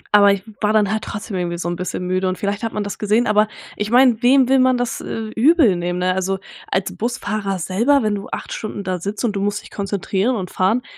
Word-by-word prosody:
aber 200 -1 +7
ich 200 +1 -2
w - - -11
war 210 +1 +2
dann 210 -2 +3
halt 220 0 -1
trotzdem 205 -1 -5
irgendwie 175 -1 -2
so 175 - -4
'n 175 - -2
bisschen 180 0 -4
müde 185 +1 0
und 185 - -3
vielleicht 205 +1 -2
hat 225 - -2
man 210 - -2
das 200 - -6
gesehen, 215 +3 +2
aber 210 0 +3 0.3
ich 210 0 -3
meine, 245 -1 +5
wem 260 +1 +5
will 265 0 +4
man 255 0 +4
das, 245 -1 -2
äh, 220 -1 -5
übel 270 - +5
nehmen, 175 +1 -2
ne? 185 0 +1
Also, 190 +1 -1 0.3
als 190 0 -1
Busfahrer 215 -4 -2
selber, 230 - +2
wenn 215 -1 +1
du 200 -1 -4
8 - - -5
Stunden 205 -2 -5
da 185 -1 -2
sitzt 200 +6 -3
und 210 -3 -1
du 195 - -1
musst 205 +1 -1
dich - - -14
konzentrieren 200 +3 -1
und 185 -4 -4
fahren, 220 +7 +1
205 Hz, 250 wpm, -20 LUFS, 190-225 Hz, 0.3 s, aber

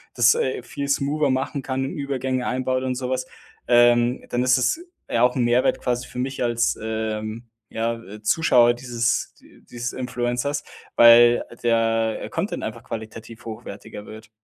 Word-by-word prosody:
das, 120 0 +6
äh, 130 -2 -2
viel 140 +3 -5
smoother 140 +1 +1
machen 130 +2 -1
kann, 135 0 -2
ähm, 135 - -5
Übergänge 130 -2 -2
einbaut 130 0 -1
und 130 -1 -1
so 125 0 -4
was, 130 - -2 0.4
ähm, 120 0 +4
dann 120 - 0
ist 125 0 +4
es 130 - +1 0.3
ja 115 - +1
auch 125 0 +3
'n 125 - +1
Mehrwert 120 +1 +2
quasi 125 0 -2
für - - -11
mich 130 +2 -3
als, 120 0 +1
ähm, 110 +1 -4 0.2
ja, 115 +1 -2
äh, 105 +1 -11
Zuschauer 120 -1 +4
dieses 120 -1 -1
d - - -21
dieses 120 +1 -4
Influencers, 125 +2 -2 0.3
weil 120 0 +7 0.2
der, 115 -1 +1
äh, - - -6
Content - - -3
einfach - - -6
qualitativ 110 +1 -8
hochwertiger 105 -2 -9
wird. 110 0 -11
120 Hz, 165 wpm, -23 LUFS, 115-130 Hz, 0.4 s, weil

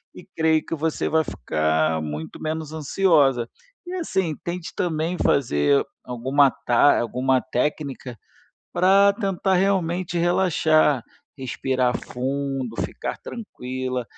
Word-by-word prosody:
e - - -11
creio 160 -1 +2
que - - -5
você 160 0 -1
vai 160 0 +3
ficar 80 - 0
muito 75 +1 -6
menos 155 0 -4
ansiosa 145 -6 +2 0.4
e, 355 - -6
assim, 190 - -1
tente 175 +1 -5
também 170 -1 -1
fazer 75 - +2 0.2
alguma 130 +3 +2
ta 125 +4 +3
alguma 130 +2 +1
técnica 130 -1 -3 0.6
pra 195 +2 +5
tentar, 195 -2 -1
realmente, 180 -2 +1
relaxar, 160 -6 +3 0.3
respirar 130 -1 -1
fundo, 135 -1 -3
ficar - - -4
tranquila, 130 - -5
145 Hz, 110 wpm, -23 LUFS, 125-175 Hz, 0.6 s, pra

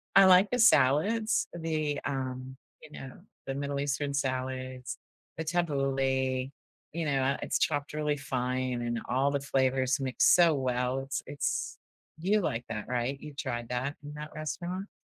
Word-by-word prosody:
I 195 - +9
like 185 +2 +7
the 250 - 0
salads, 215 - +4
the, 155 -3 -1
um, 130 -1 -4 0.2
you 155 - -14
know, 135 -1 -8 0.3
the 135 - -3
Middle 140 0 -2
Eastern 140 0 -1
salads, 130 -1 -3 0.4
the 160 - -2
tabbouleh, 135 -5 0 0.4
you 165 0 -2
know, 140 -2 +1
uh, 135 +1 +1
it's - - 0
chopped 145 -1 0
really 150 -1 0
fine 130 -2 -2
and 120 -1 -1
all 135 +3 +2
the 140 - 0
flavors 130 0 +1
mix 130 -2 +1
so 170 -3 +6
well, 125 -1 0
it's 135 +1 -3
it's 145 +1 -2 0.4
you 200 +6 +2
like 125 -8 -2
that, 105 - -4
right? 125 +2 -1
You 150 0 -9
tried 120 -4 -4
that 130 +4 -2
in 145 0 -8
that 150 0 -7
restaurant? 175 +6 -4
140 Hz, 160 wpm, -30 LUFS, 130-155 Hz, 0.4 s, I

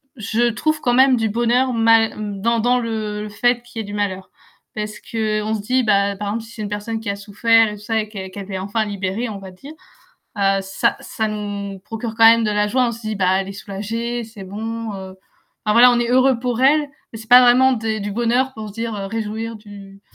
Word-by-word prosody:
je 230 +2 0
trouve 310 +7 -1
quand 245 -4 +1
même 260 0 +5
du 225 -1 0
bonheur 240 +3 +1
mal 225 -1 +4 0.3
dans 230 +2 +1
dans 245 +2 +2
le 215 -2 -3
le 210 - -6
fait 240 +3 +1
qu'il 240 -2 -9
y - - -1
ait - - -5
du 205 - -8
malheur 190 -2 -3 0.5
parce 210 0 -5
qu'on 215 -1 -2
se 210 - -4
dit, 255 +4 +1
bah, 200 -2 +2
par 205 0 -4
exemple 225 +2 -3
si 225 - -13
c'est 220 - -8
une 205 - -4
personne 210 +2 -4
qui 220 -2 -5
a 200 - -1
souffert 225 +3 +3
et 210 - -6
tout - - -15
ça 220 +1 -1
et 215 - -3
qu'elle 190 -3 -7
qu'elle 200 +1 -8
est 190 - -3
enfin 205 +3 -1
libérée 200 +3 -3
on 205 -3 -6
va 190 -1 -10
dire, 275 +12 -12 0.7
heu 195 0 +2
,ça 195 0 0
ça 220 -1 -3
nous 205 -2 -5
procure 225 +3 -6
quand 225 - +5
même 230 0 +7
de 210 - +1
la 210 0 +1
joie, 250 +2 +1
on - - -3
se 230 - -9
dit 215 0 -3
bah 190 -1 +2
elle 195 - -5
est - - -6
soulagée, 225 +5 -4
c'est 215 -3 -12
bon, 225 +3 -5
heu. 190 -1 -9 0.5
Enfin 210 - +2
voilà, 245 +2 +8
on 240 - +2
est 235 - -1
heureux 255 -1 +4
pour 245 0 -2
elle, 295 +2 +4 0.2
mais 225 - -8
c'est 220 - -12
pas 250 +1 +9
vraiment 255 +2 +5
des 220 -2 -2
du 205 +1 -4
bonheur 245 +4 0
pour 215 -1 -7
se - - -14
dire 230 -1 -3
réjouir 220 +2 -4
du 200 -2 -13
220 Hz, 245 wpm, -20 LUFS, 205-235 Hz, 0.7 s, pas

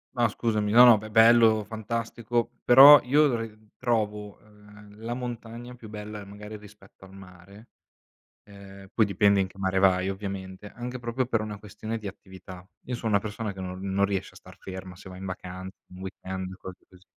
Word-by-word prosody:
No, 120 -1 +3
scusami, 105 -2 -1
no, 120 +2 +8
no, 120 -3 +8
be 110 +1 -8
bello, 110 -1 +5
fantastico, 115 +2 -3
però 140 +3 +10
io, 145 +5 +4
uhm, 110 -2 -6
trovo, 105 -4 -2
ehm, 105 0 -18
la 115 +1 -4
montagna 120 0 -7
più 115 -3 -13
bella 105 -1 -8
magari 105 +2 -10
rispetto 105 -2 -17
al 95 - -16
mare, 95 +3 -15 0.8
ehm, 100 -1 -14
poi 110 - +4
dipende 100 0 +3
in 95 - -1
che 95 - -19
mare 95 0 0
vai, 95 -1 +3
ovviamente, 95 0 -7
anche 125 +1 -7
proprio 120 +1 -2
per 115 -3 0
una 105 -1 -6
questione 110 +2 -6
di 105 - -9
attività. 95 -1 -11 0.2
Io 125 - -4
so 120 -1 -6
una 100 -2 +3
persona 105 0 -5
che 95 - -10
no 90 0 -6
non 100 +1 0
riesce 100 -2 -2
a - - -17
star - - -15
ferma 95 -1 -9
se 95 +1 -13
va 90 - -10
in 95 - -9
vacan 95 0 -7 0.2
un 90 - -11
weekend 95 -1 -6
o - - -10
cose 95 -1 -9
così. 90 0 -20
105 Hz, 190 wpm, -26 LUFS, 95-115 Hz, 0.8 s, però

